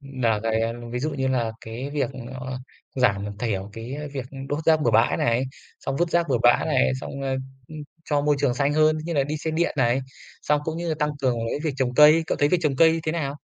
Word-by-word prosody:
nà 130 -6 -1
cái, 110 0 0
a, 115 0 0 0.2
ví 125 - -2
dụ 150 +5 -1
như 135 -3 -2
là 120 -4 0
cái 120 +5 -6
việc, 145 -3 -1 0.2
ơ, 130 0 -5 0.4
giảm 105 -5 0
thiểu 100 -4 -2
cái 115 +6 -6 0.2
việc 135 -3 -4 0.2
đốt 145 - -1
rác 160 -1 +4
bừa 120 - +3
bãi 110 +1 +3
này, 120 +2 +1 0.4
xong 135 - -3
vứt 175 +2 0
rác 170 -1 +1
bừa 130 -3 +2
bãi 120 - +4
này, 65 0 +2
xong, 140 - -6
ơ, 135 -1 -1 0.3
ưm, 155 - -9 0.3
cho 145 -1 +1
môi 145 0 +2
trường 135 -4 +2
xanh 140 +2 +1
hơn, 155 +1 +3
như 170 - -3
là 140 -2 +2
đi 150 +2 -3
xe 160 - -3
điện 165 +2 0
này, 125 +1 +2 0.4
xong 150 0 +2
cũng 160 +1 -3
như 170 0 -3
là 160 - 0
tăng 150 -1 +1
cường 125 -3 +2
cái - - -2
việc 150 -4 -1
trồng 130 -2 -1
cây, 150 +4 +7
cậu - - -1
thấy 145 - +3
việc 180 - +2
trồng 145 -3 +1
cây 165 +2 +4
thế 155 - +1
nào? 145 -4 -3
135 Hz, 250 wpm, -24 LUFS, 120-155 Hz, 0.4 s, cây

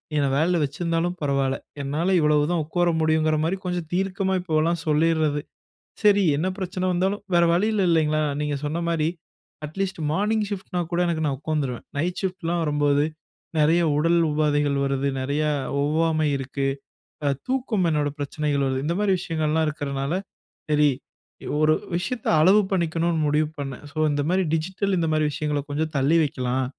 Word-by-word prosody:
என்ன 145 -2 +2
வேலைல 165 +3 +2
வச்சிருந்தாலும் 165 +4 -1
பரவாயில்ல, 140 -2 0 0.2
என்னால 155 +7 0
இவ்வளவுதான் 150 +2 +2
உக்கோர 175 +2 +1
முடியும்ங்கற 155 0 +2
மாரி 180 +4 0
கொஞ்சம் 175 -3 -2
தீர்க்கமா 190 0 0
இப்போலாம் 165 0 0
சொல்லீர்றது. 155 -1 +2 0.6
சரி 205 -1 +5
என்ன 165 +6 0
பிரச்சனை 185 0 -3
வந்தாலும் 190 +4 0
வேற 170 - +5
வழி 180 +5 +2
இல்ல 210 -2 +1
இல்லைங்களா, 155 -2 +2 0.2
நீங்க 150 -1 -1
சொன்ன 160 +4 -2
மாரி, 160 -2 +1 0.6
அட்லீஸ்ட் 190 +3 -4
மார்னிங் 210 +3 +1
ஷிப்ட் 200 -1 -6
னா - - +2
கூட 175 - +1
எனக்கு 160 -2 -1
நான் 135 -2 -1
உக்கோர்ந்துருவேன், 145 -5 -2
நைட் 175 +4 -1
ஷிப்ட்லாம் 175 -3 -1
வரும்போது 145 -1 +2 0.5
நறைய 160 +3 +4
உடல் 170 +3 +3
உபாதைகள் 145 -1 +1
வருது, 135 0 0
நறைய 140 +3 -1 0.4
ஒவ்வாமை 155 +1 +1
இருக்கு, 135 +1 -3 0.6
அ-தூக்கம் 225 - -1
என்னோட 150 -2 +1
பிரச்சனைகள் 145 0 -1
வருது. 130 0 -1
இந்த 170 - 0
மாதிரி 205 -2 +2
விஷயங்கள்லாம் 160 -2 0
இருக்றதுனால, 140 0 -3 0.6
சரி 150 -1 +4 0.7
ஒரு 155 0 +4 0.2
விஷயத்த 210 +7 -3
அளவு 195 +6 +6
பண்ணிக்கணும்னு 170 -2 0
முடிவு 150 +1 +2
பண்ணேன். 135 -1 -5
சோ 145 - -14
இந்த 145 0 0
மாரி 185 +1 +2
டிஜிட்டல் 190 +4 -1
இந்த 165 - 0
மாரி 155 0 +2
விஷயங்கள 145 0 -1
கொஞ்சம் 155 +2 -2
தள்ளி 140 +5 +3
வைக்கலாம். 130 -2 -1
155 Hz, 150 wpm, -24 LUFS, 145-175 Hz, 0.7 s, அளவு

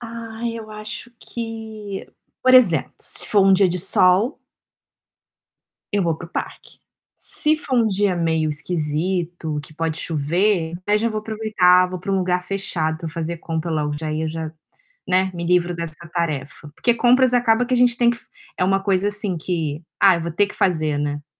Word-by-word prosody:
Ai 230 0 -6
eu 215 -1 -10
acho 215 +3 -7
que, 220 -3 -7 0.3
por 255 - +4
exemplo, 175 - +5
se - - +2
for 205 -2 +4
um 195 - +6
dia 190 0 +4
de 180 +1 0
sol 185 - +4 1.5
eu 205 -1 +1
vou 165 -3 0
para 170 - -9
o 170 - -23
parque. - - -7 0.4
Se 305 +1 +2
for 275 -4 -2
um 230 - +3
dia 200 -2 +1
meio 160 -2 0
esquisito, 160 +1 -2
que 155 - -13
pode 165 0 -2
chover, 165 +3 0 0.2
aí 210 +1 +3
já 230 +2 0
vou 215 -1 -3
aproveitar, 210 -5 +3
vou 185 -1 -6
pra 195 +2 -5
um 195 - +2
lugar 180 -1 0
fechado 180 -4 -2
pra 165 0 -6
fazer 165 +1 -4
compra 165 0 -4
logo, 150 -2 -1
já 155 +1 -4
ia 160 +1 -2
já, 160 0 -4 0.6
né, 185 +1 +2
me 170 0 -4
livro 175 0 +1
dessa 165 -2 -5 0.2
tarefa, 150 -4 -3
porque 240 - +2
compras 250 +1 +4
acaba 240 -1 +3
que 255 - 0
a - - +2
gente 245 -1 +4
tem 240 -1 +4
f 235 - -8
que - - -9
é - - +4
uma 195 +1 +2
coisa 195 0 +1
assim 205 -3 +1
que: 160 -2 -3 0.2
"Ah 195 -2 +6
eu - - -4
vou 170 - -4
ter 205 +5 +3
que 200 - -10
fazer.", 155 -5 +1
né. 145 0 -3
180 Hz, 190 wpm, -21 LUFS, 160-215 Hz, 1.5 s, um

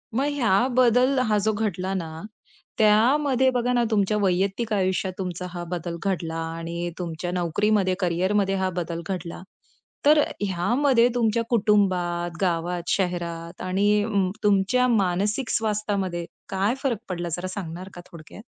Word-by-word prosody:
मग 270 +3 +1
ह्या 235 -3 +3
बदल 255 +2 +4
हा 210 -1 +2
जो 220 - +2
घडला 195 -3 -2
ना, 175 -4 -3 0.7
त्यामध्ये 260 +5 +4
बघा 245 +1 0
ना 240 -1 +3
तुमच्या 210 0 +2
वैयक्तिक 195 +4 0
आयुष्यात 190 -1 0
तुमचा 180 -1 -4
हा 175 0 -6
बदल 170 -1 -4
घडला 170 -4 -2 0.2
आणि 170 +1 -4
तुमच्या 170 0 -4
नोकरीमध्ये 185 +2 +1
करिअरमध्ये 190 +3 +1
हा 190 -1 0
बदल 170 -1 -4
घडला. 175 -3 -5 0.6
तर 300 +1 +6
अ, - - -1 0.2
ह्यामध्ये 235 +7 +3
तुमच्या 230 -1 +1
कुटुंबात, 185 -6 +1
गावात, 175 -1 -1
शहरात 170 -2 -3
आणि 205 +3 +2
उम्म 200 -4 +1
तुमच्या 210 +5 +3
मानसिक 210 +2 0
स्वास्थ्यामध्ये 205 -5 -1 0.2
काय 195 +4 +1
फरक 255 -5 +1
पडला 175 -1 -3
जरा 185 - -4
सांगणार 185 -1 -6
का 175 - -8
थोडक्यात? 165 +4 -12
195 Hz, 140 wpm, -24 LUFS, 175-220 Hz, 0.7 s, तर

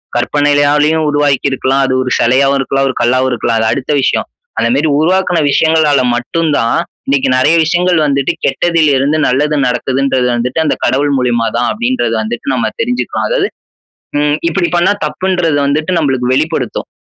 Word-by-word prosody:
கற்பனையாலும் 145 +4 +1
உருவாக்கிருக்கலாம், 140 -2 0
அது 130 - -1
ஒரு 130 - -3
சிலையாவும் 135 +3 +2
இருக்கலாம், 135 0 0
ஒரு 130 - -4
கல்லாவும் 130 +2 +1
இருக்கலாம், 120 -1 -1
அது 110 0 +1
அடுத்த 140 +1 -4
விஷயம். - - 0 0.3
அந்த 115 0 +1
மாரி 145 +4 +1
உருவாக்குன 180 +2 +1
விஷயங்களால 155 -2 +2
மட்டும் 165 +7 -2
தான், 115 0 0 0.3
இன்னைக்கு 140 -1 +1
நெறைய 145 +6 +3
விஷயங்கள் 175 +2 +1
வந்துட்டு 140 -2 0
கெட்டதில் 165 +1 +1
இருந்து 140 +4 +1
நல்லது 150 +4 0
நடக்குதுன்றது 130 +1 0
வந்துட்டு, 125 +5 -2
அந்த - - +1
கடவுள் 145 +2 +1
மூலியமா 120 -2 0
தான், 120 +1 0
அப்டின்றது 240 - -1
வந்துட்டு 115 +2 -5
நம்ம 115 -3 -1
தெரிஞ்சுக்கலாம். 245 +2 -2
அதாவது, - - 0 0.7
ம், 145 0 +1
இப்படி 170 +1 0
பண்ணா 175 +3 +3
தப்புன்றது 165 0 -1
வந்துட்டு 155 +4 -1
நம்மளுக்கு 130 -5 0
வெளிப்படுத்தும். 145 -3 -2
140 Hz, 150 wpm, -13 LUFS, 130-160 Hz, 0.7 s, நெறைய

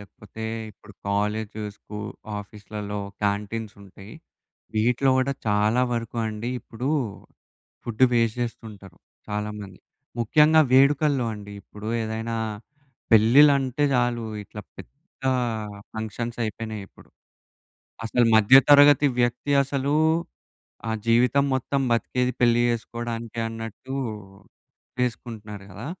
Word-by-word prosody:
లేకపోతే 105 +2 -10 0.3
ఇప్పుడు 105 +1 -17 0.2
కాలేజు, 105 +1 -1
స్కూ 105 0 -9 0.4
ఆఫీస్లల్లో 105 0 -7 0.2
క్యాంటీన్సుంటయి. 100 -1 -4 0.6
వీటిలో 125 +5 +2
గూడా 135 +1 +1
చాలా 105 +4 +2
వరకు 115 0 -4
అండి 110 +2 -4
ఇప్పుడూ, 125 +5 -5 1.0
ఫుడ్డు 120 +2 +2
వేస్ట్ 115 0 +1
జేస్తుంటరు. 105 -5 -8 0.3
చాలామంది. 105 -2 -5 0.4
ముఖ్యంగా 150 +7 +5
వేడుకల్లో 140 -1 +4
అండి. 105 0 -10
ఇప్పుడు 105 +1 -9
ఏదైనా, 110 +1 -3 0.8
పెళ్ళిల్లంటే 135 +4 +5
చాలు 120 -2 +1 0.2
ఇట్లా 105 - -9 0.2
పెద్దా 140 -3 -5 0.6
ఫంక్షన్సయిపోయినాయిప్పుడు. 110 -2 -5 1.0
అసలు 120 +2 +2
మధ్యతరగతి 145 +5 +7
వ్యక్తి 120 +4 0
అసలూ, 140 +2 -1 0.9
ఆ - - -1 0.2
జీవితం 125 +4 +4
మొత్తం 135 +2 -1
బతికేది, 125 +2 0
పెళ్లి 120 -1 +4
జేసుకోడానికే 115 0 -4
అన్నట్టూ 115 +4 -7 1.1
జేసుకుంటున్నారు 110 -4 -4
గదా! 100 +8 -8
115 Hz, 90 wpm, -24 LUFS, 105-125 Hz, 1.1 s, మధ్యతరగతి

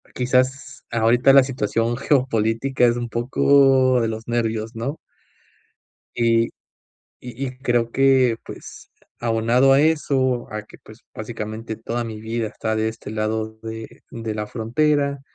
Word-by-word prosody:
quizás 130 +2 0
ahorita 120 +3 +4
la 135 -1 +8
situación 120 -2 -1
geopolítica 125 -2 +1
es 120 -1 +3
un 120 -1 -4
poco 130 +1 +3
de 115 - 0
los 110 0 -6
nervios, 115 -1 -2
¿no? 130 +7 -4 1.2
y 115 -1 +2 0.8
y 125 +2 -5
y 130 -1 -7
creo 120 -3 0
que, 130 -3 +3
pues, - - -11 0.3
abonado 120 +3 +3
a 135 - +5
eso, 135 -5 +1
a 105 0 -4
que, - - -16
pues, 110 +2 -16
básicamente 110 0 -6
toda 115 +2 -4
mi 110 -2 -7
vida 110 0 -3
está 110 0 -3
de 110 0 0
este 110 -2 -8
lado 110 0 -3
de 110 0 -8
de 115 -2 -5
la 105 0 -3
frontera, 140 +4 0
120 Hz, 140 wpm, -22 LUFS, 110-130 Hz, 1.2 s, la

